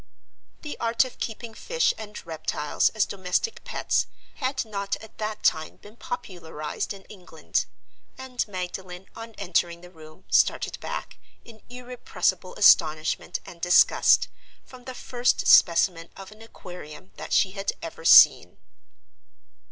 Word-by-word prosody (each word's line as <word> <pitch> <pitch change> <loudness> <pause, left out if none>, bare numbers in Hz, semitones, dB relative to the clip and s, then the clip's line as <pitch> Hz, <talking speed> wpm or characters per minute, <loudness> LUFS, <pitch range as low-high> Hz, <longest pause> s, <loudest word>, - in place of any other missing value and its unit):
The 300 - -7
art 230 +2 +2
of 255 - -11
keeping 225 0 -6
fish 485 - 0
and 210 -3 -9
reptiles 155 -2 -1
as 215 -2 0
domestic 190 - -2
pets - - -1 0.3
had 260 -2 -2
not 200 -2 -3
at 220 +1 -15
that 215 0 -4
time 160 0 +1
been 205 +2 -16
popularized 175 - -6
in 195 -1 -8
England; 180 -5 -4 0.5
and 260 -1 -3
Magdalen, 185 -1 -7
on 225 0 -9
entering 175 -3 -1
the 180 0 -14
room, 155 +1 -16
started - - +2
back, - - -6 0.3
in 225 -2 -15
irrepressible 250 0 -3
astonishment 155 -2 +3
and 170 - -12
disgust, 175 +1 +4 0.4
from 250 -1 -15
the 255 - -7
first 245 0 0
specimen 170 -1 +4
of 195 +1 -10
an 215 +1 -16
Aquarium 180 -5 -11
that - - -8
she 190 - +3
had 195 0 -3
ever 165 0 -8
seen. - - +7
195 Hz, 135 wpm, -25 LUFS, 175-230 Hz, 0.5 s, seen